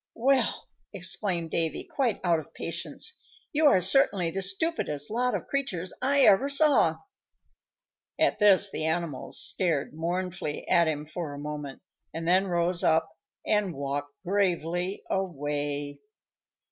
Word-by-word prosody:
"Well!" 265 +3 +1 0.3
exclaimed 175 -6 -2
Davy, 160 -3 -1
quite 255 -7 -1
out 170 -3 +2
of 155 - -13
patience. 460 - -3 0.3
"You 305 +1 +4
are 195 - +5
certainly 190 -3 +4
the 195 - -3
stupidest 190 - 0
lot 250 +2 0
of - - -4
creatures 210 -11 -3
I 280 +2 +3
ever 250 +3 +5
saw." 290 +1 +4 1.2
At - - +2
this 200 -1 +5
the 155 - -2
animals 160 -4 -1
stared 160 -3 0
mournfully 175 -1 -4
at 170 -1 +4
him 150 -1 -2
for 155 -1 -6
a - - -8
moment, 150 -1 -7 0.3
and 165 0 -4
then 185 +3 +3
rose 175 0 +1
up 160 0 +2 0.3
and 210 -5 0
walked 140 +1 -4
gravely 180 -1 -1
away. 145 -5 -3
175 Hz, 135 wpm, -27 LUFS, 155-205 Hz, 1.2 s, are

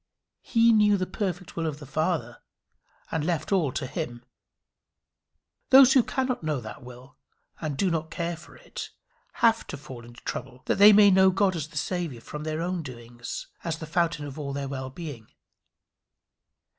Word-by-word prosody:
He 230 -1 +4
knew 210 -1 +5
the 185 - -1
perfect 185 -2 -4
will 165 -1 -1
of 150 -2 -3
the 150 - -10
Father, 145 -4 -2 0.7
and 160 -2 -1
left 155 -2 -2
all 175 -9 +2
to 140 - -2
him. 125 -4 -5 1.4
Those 265 0 +8
who 265 - +7
cannot 255 +1 -2
know 155 -3 -1
that 110 -2 -9
will 125 +1 -13 0.4
and 150 -4 -3
do 190 +2 +1
not 160 -1 -2
care 170 0 -3
for 165 - -15
it, - - -8 0.6
have 225 0 +3
to - - -6
fall 130 -4 -10
into 120 +1 -14
trouble 125 0 -6
that - - 0
they 205 +1 +10
may 205 -1 +7
know 190 0 +6
God 190 0 +2
as 155 -3 -3
the 155 -1 -10
Saviour 170 -6 -2
from 150 +6 -8
their 155 +1 -2
own 180 0 -2
doings 120 -3 -8 0.2
as 165 -1 -2
the 160 - -7
fountain 165 -2 0
of 145 +1 -8
all 140 -2 -4
their 140 0 -3
well 130 -1 -5
being. 135 -6 -8
160 Hz, 180 wpm, -27 LUFS, 135-185 Hz, 1.4 s, they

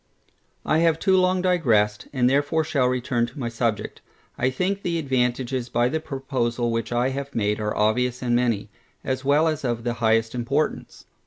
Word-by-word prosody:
I 155 - +2
have 165 -1 +3
too 190 +2 +2
long 185 0 +2
digressed, 115 - +2
and 125 -3 +2
therefore 145 +4 +2
shall 140 -4 +1
return 125 -1 0
to - - -14
my 120 -4 -3
subject. 115 -2 -2 0.3
I 130 - +1
think 185 +9 -1
the 170 -3 -1
advantages 130 -3 -1
by 120 +1 +1
the 160 +4 -1
proposal 130 -5 -2
which 115 +1 -2
I 120 +2 +1
have 140 +1 -5
made 105 -1 0
are 105 0 -2
obvious 125 +4 +1
and 120 -1 +1
many, 120 -4 0 0.3
as 130 0 -2
well 145 +4 +3
as 155 -2 -2
of 120 -2 -2
the 120 0 -1
highest 115 0 +2
importance. 125 +5 -2
125 Hz, 180 wpm, -24 LUFS, 120-145 Hz, 0.3 s, have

